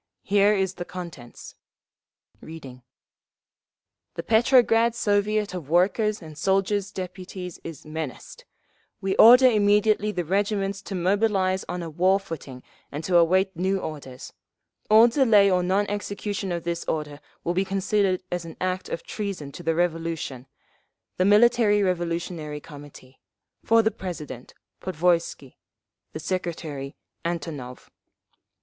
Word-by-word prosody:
Here 205 +1 +3
is 190 -2 0
the 180 - -6
contents." 170 -10 -9 0.9
Reading: 145 -6 -10 1.4
_"'The - - -4
Petrograd 230 0 +4
Soviet 205 -1 0
of 170 -6 -7
Workers' 200 +4 +2
and 155 -1 -10
Soldiers' 195 +3 0
Deputies 185 -1 -7
is 160 -3 -9
menaced. 155 -4 -7 0.5
We 190 0 -1
order 250 +3 +9
immediately 210 -2 +3
the 180 -3 -3
regiments 195 +1 -1
to 195 - -5
mobilise 190 0 +1
on 180 0 -3
a 165 - -5
war 185 +5 +3
footing 140 -8 -9 0.3
and 145 +3 -5
to 175 +2 +3
await 185 +3 +3
new 190 +3 0
orders. 140 -7 -8 0.6
All 220 +2 +8
delay 225 -6 +4
or 180 -1 +3
non 190 +3 +1
execution 205 -1 -4
of 170 -1 -3
this 170 0 -3
order 150 -2 -4 0.2
will 175 - -1
be 185 +2 +1
considered 195 -1 0
as 175 -1 -2
an 165 -1 -10
act 185 0 -2
of - - -4
treason 195 -9 -5
to 175 - -10
the 165 -1 0
Revolution. 165 -6 -2 0.7
The 185 - +2
Military 210 0 +4
Revolutionary 170 -4 -2
Committee. 145 -3 -14 0.4
For 230 0 +4
the 220 - +2
President, 155 - -8 0.3
Podvoisky. 170 -6 -1 0.6
The - - -5
Secretary, 160 -5 -4 0.3
Antonov. 155 -7 -5
185 Hz, 130 wpm, -25 LUFS, 165-205 Hz, 1.4 s, order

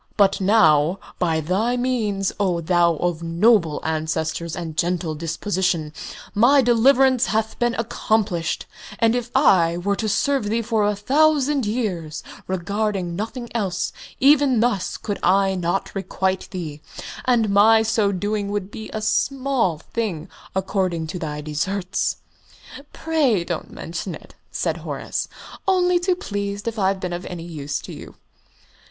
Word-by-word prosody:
"But 200 -1 +3
now, 175 -5 +4 0.2
by 165 -3 +1
thy 205 +10 0
means, 220 -6 0
O 185 -4 +1
thou 170 0 +3
of 170 0 -1
noble 170 -1 +3
ancestors 160 +1 -2
and 165 -3 -5
gentle 170 -1 0
disposition, 165 0 -1 0.4
my 255 +6 +5
deliverance 255 +2 +4
hath 220 0 -1
been 240 -1 +1
accomplished; 215 -6 -1 0.3
and 230 -1 +3
if 245 -1 -2
I 175 - +4
were 200 +3 0
to 215 +1 -1
serve 275 +2 +1
thee 225 +3 0
for 220 -2 +1
a 210 - +1
thousand 280 +2 +2
years, 185 -9 -3 0.2
regarding 190 0 -2
nothing 235 +5 -4
else, 190 -6 -1 0.3
even 275 -3 +5
thus 230 -5 0
could 205 -2 -4
I 195 0 +3
not 180 +1 -2
requite 190 -1 -2
thee, 155 -5 -6 0.4
and 230 -5 +2
my 220 +2 +6
so 220 -2 +1
doing 205 +1 -2
would 205 -1 -3
be 220 0 -8
a 215 - -4
small 260 - +1
thing 175 -2 -4 0.3
according 185 -3 -1
to 180 - -4
thy 150 -3 -4
desserts!" 180 +6 -2 0.7
"Pray 285 - +1
don't 170 -2 -4
mention 165 +1 -5
it," - - -14 0.2
said - - -2
Horace; - - -4 0.4
"only 360 -2 +3
too 360 +1 +1
pleased 205 - -4
if 225 -1 -3
I've 195 0 +1
been 180 -1 -4
of 175 +1 -4
any 175 -2 -6
use 145 -4 -4
to - - -9
you." - - -11
200 Hz, 145 wpm, -22 LUFS, 170-230 Hz, 0.7 s, my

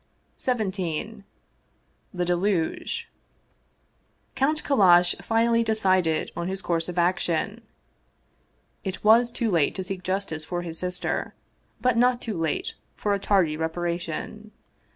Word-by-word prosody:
XVII 210 -3 -2 0.9
THE 180 -2 -2
DELUGE 175 -1 -1 1.3
COUNT 300 +3 +1
KALLASH 180 -9 +5
finally 230 +1 +2
decided 185 -7 +1
on 170 0 -3
his 190 0 -3
course 165 0 0
of 180 - -6
action. 175 +4 0 1.2
It 190 -1 -5
was 230 +3 +5
too 235 -2 -1
late 165 -5 +2
to 190 - -3
seek 190 -1 -5
justice 185 -4 -2
for 175 +2 -4
his 165 -2 -4
sister, 180 0 -2 0.5
but 250 -2 +2
not 245 +1 +4
too 225 -4 -4
late 165 -2 -2 0.2
for 205 - 0
a 200 - 0
tardy 190 -6 +2
reparation. 170 +5 -4
185 Hz, 120 wpm, -25 LUFS, 175-220 Hz, 1.3 s, KALLASH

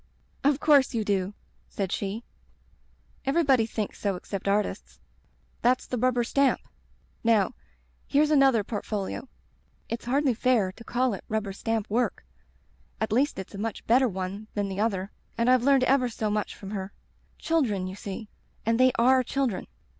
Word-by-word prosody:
"*Of 285 0 +3
course 280 -5 +4
you 225 - +1
do* 200 0 0 0.3
said 195 -3 -3
she, 205 +3 -3 1.0
'Every 300 +4 +2
body 260 -6 +3
thinks 215 -2 -4
so 200 -2 0
except 195 +2 -6
artists. 205 +1 -1 0.6
That's 250 +1 +2
the 250 - -3
Rubber 250 0 +2
Stamp. 275 +3 +2 0.6
Now, 220 -5 +3 0.5
here's 300 +2 +3
another 270 -7 +5
port 205 0 -4
folio. 210 +4 -4 0.6
It's 230 0 -4
hardly 270 +1 +2
fair 230 -5 +2
to 230 - -14
call 250 0 0
it 195 - -6
rubber 215 -2 -2
stamp 220 +1 -2
work; 240 +4 -1 0.7
at 220 -1 -1
least 265 +6 +2
it's 190 +1 -7
a 200 - -7
much 225 0 -4
better 255 +3 +4
one 190 +1 -5
than 205 -1 -1
the 190 0 -4
other, 200 -3 0 0.3
and 235 +2 +3
I've 255 -1 +5
learned 270 0 +4
ever 255 -1 +3
so 220 -2 -2
much 210 0 -2
from 195 0 -9
her. 195 -2 -4 0.5
Children, 240 - 0
you 185 - -5
see;*and 210 +3 -5
they 255 0 +6
are 255 +2 +5
children. 255 -4 -1
225 Hz, 160 wpm, -27 LUFS, 200-255 Hz, 1.0 s, they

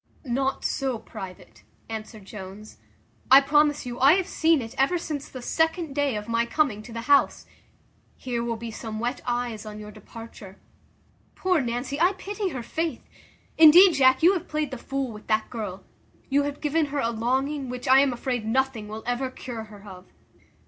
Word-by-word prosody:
"Not 270 +2 -1
so 265 -4 -1
private," 190 -4 -10 0.3
answered 220 -2 -7
Jones; 200 +1 -10 0.5
"I 265 - +10
promise 295 0 +2
you, 245 0 -6
I 275 +4 +7
have 375 0 +1
seen 325 -4 +2
it 225 -2 -7
ever 275 +7 +2
since 300 -4 -5
the 255 -2 -9
second 320 0 0
day 285 -4 0
of 210 0 -5
my 230 0 +1
coming 245 -6 0
to 225 - -12
the 230 0 -5
house. 280 +3 +3 0.7
Here 240 -2 -3
will 235 -1 -2
be 230 0 -7
some 220 -1 -6
wet 245 +3 -2
eyes 240 -3 -2
on 210 -1 -8
your 210 0 -9
departure. 215 -2 -12 0.8
Poor 365 -4 +1
Nancy, 245 +3 -3
I 360 +3 +4
pity 400 +1 -4
her, 255 -7 -5
faith! 320 +1 -3 0.6
Indeed, 340 +4 +9
Jack, 260 0 +4
you 360 +3 +7
have 360 -2 -4
played 305 -2 -2
the 260 - -5
fool 270 -1 -3
with 210 -1 -12
that 215 0 0
girl. 205 -5 -5 0.5
You 280 +1 +4
have 290 - -10
given 305 +1 +1
her 285 0 -3
a 230 -3 0
longing, 265 +4 -1
which 250 +1 -6
I 260 +1 +7
am 275 -1 +3
afraid 245 -1 -3
nothing 235 -1 -1
will 215 +1 -7
ever 245 +2 -1
cure 235 -3 -7
her 210 -1 -14
of." 185 -1 -11
255 Hz, 185 wpm, -25 LUFS, 225-290 Hz, 0.8 s, I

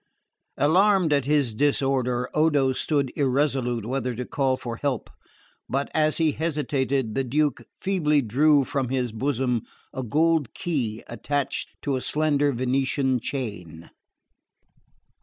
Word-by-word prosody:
Alarmed 180 +2 +4
at 140 -3 +1
his 140 -5 +2
disorder, 130 -2 +1
Odo 145 -4 +3
stood 140 -1 0
irresolute 130 -4 0
whether 125 0 -2
to 125 +2 -4
call 130 -1 0
for 120 -3 -6
help; 135 -4 -2 0.6
but 140 +2 -1
as 155 -1 +2
he 160 -2 +3
hesitated 140 -6 -1
the 135 - 0
Duke 145 +3 0 0.2
feebly 150 -7 +1
drew 140 +5 +4
from 135 -1 -2
his 125 -2 -1
bosom 125 0 -1 0.3
a 130 - -3
gold 155 +2 +1
key 120 -10 -2
attached 140 +4 -3
to 140 - 0
a - - -4
slender 145 -1 +2
Venetian 130 +1 0
chain. 100 - -6
135 Hz, 125 wpm, -25 LUFS, 125-150 Hz, 0.6 s, Alarmed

